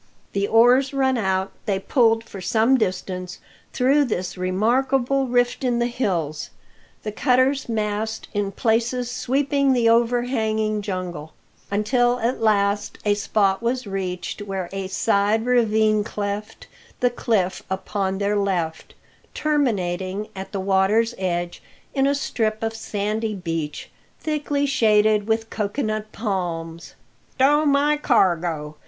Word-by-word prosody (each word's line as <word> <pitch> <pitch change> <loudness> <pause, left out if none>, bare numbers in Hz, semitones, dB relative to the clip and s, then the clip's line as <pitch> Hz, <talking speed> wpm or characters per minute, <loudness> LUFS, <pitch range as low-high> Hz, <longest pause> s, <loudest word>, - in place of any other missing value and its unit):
The 200 0 0
oars 250 +5 +4
run 265 -1 +2
out, 190 -4 0 0.2
they 200 -2 +1
pulled 225 +2 +2
for 195 -4 -10
some 225 +7 +3
distance 185 -4 -2 0.3
through 275 +3 +3
this 180 -6 -3
remarkable 255 +8 +1
rift 245 +1 +1
in 245 -2 +1
the 240 - +1
hills, 180 - -2 0.5
the 215 - -3
cutter's 260 +3 +2
mast 215 0 -2
in 205 -2 -1
places 235 +3 0
sweeping 275 +2 +1
the 235 -2 +3
overhanging 230 -2 +1
jungle; 180 -6 -5 0.4
until 240 +4 +2
at 235 +1 -1
last 205 -1 +1
a 205 - +4
spot 200 -1 +1
was 245 +1 -1
reached 185 -1 -4
where 195 -3 -4
a 195 -1 -3
side 205 +3 +1
ravine 220 -3 +3
cleft 205 0 -5 0.3
the 245 -1 +2
cliff 200 -6 0
upon 190 0 -2
their 200 +1 0
left, 180 -6 -2 0.4
terminating 205 -9 -1
at 190 0 -7
the 200 - -3
water's 200 +5 +2
edge 175 -2 -2 0.3
in 275 -1 +2
a 280 - +2
strip 220 -5 -2
of 225 0 -1
sandy 215 0 -2
beach, 165 -5 -4 0.3
thickly 290 -2 -1
shaded 215 -5 +3
with 225 0 -1
cocoa 210 +6 -2
nut 215 -1 -3
palms. 170 -6 -4 0.4
"Stow 295 +3 +4
my 290 +1 +3
cargo!" 170 - +1
215 Hz, 130 wpm, -23 LUFS, 190-245 Hz, 0.5 s, oars